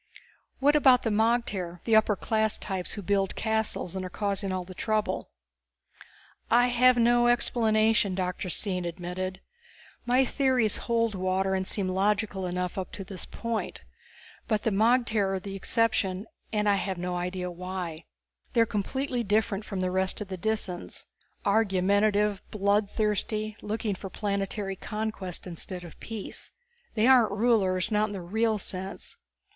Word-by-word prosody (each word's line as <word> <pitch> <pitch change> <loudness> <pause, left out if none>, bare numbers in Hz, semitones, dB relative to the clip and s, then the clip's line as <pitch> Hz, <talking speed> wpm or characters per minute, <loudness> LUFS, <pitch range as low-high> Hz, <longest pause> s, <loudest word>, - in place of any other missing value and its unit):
"What 290 +2 +4
about 260 -4 +6
the 225 - 0
magter, 210 -5 0
the 225 - +3
upper 215 -1 +4
class 220 +2 0
types 190 -2 -3
who 205 - -5
build 195 0 +1
castles 220 -5 -1
and 190 - -3
are 185 - -4
causing 200 0 -2
all 185 -1 -2
this 185 0 -10
trouble?" 215 -1 -1 1.2
"I 245 +2 +5
have 250 +1 +5
no 240 0 +4
explanation," 220 -4 +3
Dr. 180 0 -2
Stine 180 0 -2
admitted. 180 +2 -4 0.7
"My 255 +2 +4
theories 255 -5 +2
hold 230 -1 +2
water 190 0 0
and 190 0 -1
seem 195 -3 -1
logical 195 0 0
enough 180 +1 -2
up 185 - -5
to 195 - -5
this 190 -1 -5
point. 230 -1 -4 0.6
But 215 -3 0
the 225 - +1
magter 220 -2 +2
are - - -2
the 195 +1 -7
exception, 200 -2 0 0.3
and 210 -1 +1
I 200 -1 +4
have 190 -1 -2
no 180 +1 -3
idea 180 0 -3
why. 180 -2 -5 0.5
They 235 - +4
are - - +5
completely 245 +5 -2
different 210 0 +1
from 195 -3 -3
the 185 0 0
rest 190 0 +1
of 210 -2 -6
the 190 - -3
Disans. 195 -3 -3 0.4
Argumentative, 200 0 +2
blood 205 0 +1
thirsty, 215 0 -1
looking 215 0 -2
for 195 +1 -7
planetary 200 0 -2
conquest 210 -3 -4
instead 180 +1 -6
of 170 - -12
peace. 225 -3 -7 0.4
They 215 0 +3
aren't 245 -5 +6
rulers, 205 -4 +2
not 215 +1 +2
in - - -6
the 195 - -5
real 220 +4 +1
sense. 190 0 -6
205 Hz, 155 wpm, -28 LUFS, 185-220 Hz, 1.2 s, about